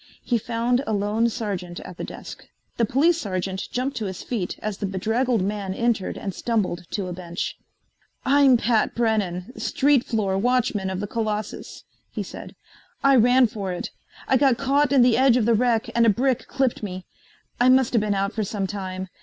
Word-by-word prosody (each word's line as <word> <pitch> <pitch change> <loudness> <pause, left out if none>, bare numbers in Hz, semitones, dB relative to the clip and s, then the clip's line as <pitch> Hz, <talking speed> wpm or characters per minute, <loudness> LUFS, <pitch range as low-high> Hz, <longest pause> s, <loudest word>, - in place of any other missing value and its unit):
He 240 -2 +1
found 240 +3 0
a 220 - 0
lone 210 +3 +1
sergeant 190 -6 -4
at 180 - -10
the - - -5
desk. - - -9 0.3
The 235 - +3
police 310 +9 +2
sergeant 190 - -3
jumped 255 +3 -2
to 220 - -2
his 190 -2 -5
feet 215 -8 -3
as 210 -2 -4
the 200 - -2
bedraggled 220 +4 0
man 195 -1 -3
entered 230 -5 0
and 195 - -4
stumbled 190 -7 -1
to 200 - -3
a 180 - -5
bench. 175 0 -5 0.7
"I'm 275 -2 +5
Pat 230 -1 +1
Brennan, 210 -3 -1
street 280 -2 +2
floor 200 -6 -1
watchman 240 -4 +1
of 190 0 -3
the - - -2
Colossus," 215 -1 -4 0.3
he - - -4
said. - - -10 0.5
"I 275 0 +6
ran 250 +2 +5
for 205 -4 -4
it. 180 - -5 0.4
I 265 - +4
got 265 -3 +3
caught 280 +1 +2
in 270 -3 +6
the 245 -2 +4
edge 260 -1 +5
of 235 - +1
the 235 - +4
wreck 235 +1 +2
and 235 - +3
a 230 - +6
brick 250 +2 +1
clipped 265 -3 0
me. 185 -3 -6 0.5
I 245 +1 +5
musta 255 -2 +4
been 210 -1 0
out 195 +2 -1
for 220 - -1
some 200 -1 -2
time. 190 -1 -5
225 Hz, 190 wpm, -24 LUFS, 195-250 Hz, 0.7 s, I